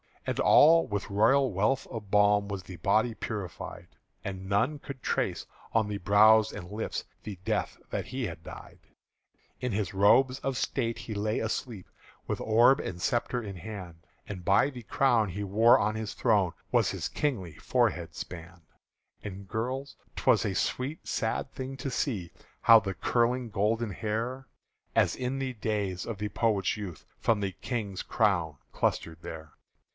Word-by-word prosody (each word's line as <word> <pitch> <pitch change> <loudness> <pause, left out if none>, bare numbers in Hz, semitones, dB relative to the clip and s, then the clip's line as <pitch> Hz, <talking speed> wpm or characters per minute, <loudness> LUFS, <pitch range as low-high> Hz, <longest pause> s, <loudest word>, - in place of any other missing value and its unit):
And - - -2
all 165 +2 +6
with 105 -1 -3
royal 130 +6 +4
wealth 105 +8 +1
of 110 -5 -7
balm 105 0 +4
Was 100 -2 -5
the 90 0 -10
body 110 +7 +2
purified; 105 -4 -6 0.4
And 95 -1 -5
none 115 +9 +1
could 140 -2 -9
trace - - -1 0.3
on 110 -2 +3
the 105 - -2
brow 105 +3 +6
and 90 +2 -8
lips 110 +2 -3 0.2
The 105 -3 -6
death - - -1
that - - -3
he 130 -1 -3
had 85 -4 -7
died. - - -11 0.8
In 125 - -2
his 100 -2 -2
robes 125 +7 +4
of 135 -2 -2
state 115 0 -1
he 110 - -6
lay 105 +1 -1
asleep 110 -2 -4 0.4
With - - -2
orb 120 +5 +5
and 90 - -5
sceptre 120 +2 0
in 100 -3 -7
hand; 85 -4 -9 0.2
And 95 -4 -7
by 100 +8 +4
the 125 -3 -9
crown 115 -3 +2
he 100 +4 -4
wore 110 +4 +5
on 105 +1 +1
his 110 -1 -4
throne 100 -7 +2 0.2
Was - - +3
his - - -3
kingly 105 - -2
forehead - - 0
spann'd. 85 -1 -9 0.6
And, 100 -1 -7
girls, 130 +6 -3 0.2
't - - -6
was - - +5
a - - -1
sweet 140 +5 -2
sad 110 +4 -1
thing 130 +1 -6
to 135 +1 -4
see 105 - -2 0.3
How 115 0 +8
the 95 -2 -4
curling 120 +3 +1
golden 110 +2 0
hair, 115 +6 -3 0.5
As - - +3
in 130 +1 -2
the 135 -1 -2
day 105 -3 -1
of 115 -3 -5
the 105 +1 -3
poet's 105 -2 +1
youth, 95 -7 -7
From 115 -2 +2
the 100 -2 -1
King's 105 -3 -4
crown 90 -9 +1
clustered 80 0 -1
there. 80 -2 -8
105 Hz, 165 wpm, -29 LUFS, 100-120 Hz, 0.8 s, How